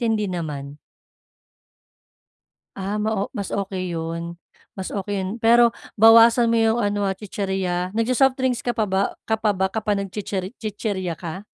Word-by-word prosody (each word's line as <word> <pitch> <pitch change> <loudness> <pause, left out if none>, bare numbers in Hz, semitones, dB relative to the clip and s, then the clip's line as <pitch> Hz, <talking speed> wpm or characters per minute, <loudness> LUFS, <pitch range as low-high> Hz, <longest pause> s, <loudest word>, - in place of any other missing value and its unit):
hindi 225 -3 +1
naman? 150 -5 -5 2.0
Ah, 200 +2 -3
ma 215 +1 0
o 195 - -1
mas 200 -2 -4
okey 190 -2 -3
'yon, 165 +1 -4 0.4
mas 190 -1 -5
okey 205 0 -3
'yon 185 - -3
pero 235 +1 +5 0.2
bawasan 230 +2 +7
mo 230 - +2
yung 225 +1 +3
ano, 205 0 0
ah, 195 - 0
chichirya. 190 -3 -3
Nag-so-softdrinks 255 +1 +1
ka 240 - 0
pa 220 -2 +1
ba 190 +1 +1 0.3
ka 220 - +2
pa 215 -1 +2
ba 190 0 0
kapag 210 -1 -1
nag-chichir 195 -1 -4
chichirya 205 -5 -3
ka? 185 +4 -7
205 Hz, 150 wpm, -22 LUFS, 185-225 Hz, 2.0 s, bawasan